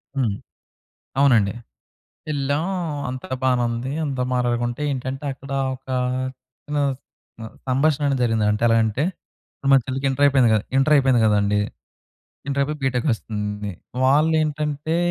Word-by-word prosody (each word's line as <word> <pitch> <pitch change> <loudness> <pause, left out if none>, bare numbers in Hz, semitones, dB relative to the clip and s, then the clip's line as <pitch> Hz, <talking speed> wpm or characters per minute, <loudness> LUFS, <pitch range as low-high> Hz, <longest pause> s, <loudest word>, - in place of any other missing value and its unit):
హ్మ్. 125 -7 +1 0.9
అవునండి 120 -8 +4 0.8
యెళ్ళాం. 145 +1 0 0.4
అంతా 130 0 -7
బానే 125 -1 +3
ఉంది. 120 +3 -3
అంతా 135 -3 -2
మాట్లాడుకుంటే 120 +1 0
ఏంటంటే, 130 +1 -4
అక్కడ 135 +1 -12 0.2
ఒక 130 - -21 0.8
చిన్న 150 0 -2 0.2
స్ - - -39 0.4
ఆహ్, 110 - -9
సంభాషణ 140 +3 +2
అనేది 135 -2 0
జరిగింది. 115 -3 +1
అంటే 105 +2 -1
ఎలాగంటే, 115 +4 +2 0.7
మా 135 - +8
చెల్లికి 135 +1 -2
ఇంటరపోయింది 135 -3 +4
కదా! 110 - +2
ఇంటరయిపోయింది 135 -4 +4
కదండీ! 105 -1 +2 0.9
ఇంటరయిపోయి 140 +2 -1
బీటెక్కొస్తుంది. 110 -6 -2 0.3
వాళ్ళేంటంటే, 150 +1 +1
130 Hz, 110 wpm, -22 LUFS, 115-140 Hz, 0.9 s, మా